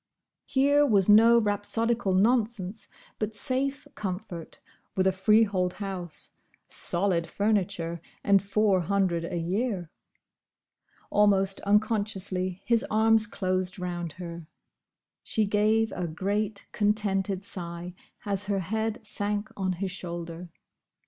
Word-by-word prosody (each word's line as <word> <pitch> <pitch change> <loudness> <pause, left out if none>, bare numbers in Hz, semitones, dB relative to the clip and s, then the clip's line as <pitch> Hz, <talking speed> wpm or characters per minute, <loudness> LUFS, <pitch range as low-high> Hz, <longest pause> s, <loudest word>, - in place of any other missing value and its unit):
Here 285 +2 +4
was 205 -9 +3
no 225 +3 +7
rhapsodical 215 0 0
nonsense, 215 -1 +1 0.3
but 215 0 -2
safe 270 +5 -1
comfort, 185 -4 -6 0.4
with 185 - +2
a 190 - +5
freehold 190 -1 +2
house, 190 -5 -5 0.4
solid 175 -2 +2
furniture, 185 -4 -1 0.2
and 200 -1 +4
Four 200 -1 +2
hundred 180 -2 0
a 175 0 -3
year. 180 0 -2 1.2
Almost 195 -2 +3
unconsciously 200 -3 0
his 235 -1 +2
arms 220 0 +4
closed 185 -2 -1
round 175 -3 -4
her. 170 -3 -8 0.8
She 220 - 0
gave 215 +2 +2
a 180 -1 -3
great, 200 +5 -2
contented 200 -2 0
sigh, 175 -2 -5 0.3
as 200 -1 -1
her 200 -1 0
head 220 +4 -2
sank 205 +1 -2
on 190 -1 -1
his 190 +1 -3
shoulder. 170 -1 -6
200 Hz, 110 wpm, -27 LUFS, 180-215 Hz, 1.2 s, no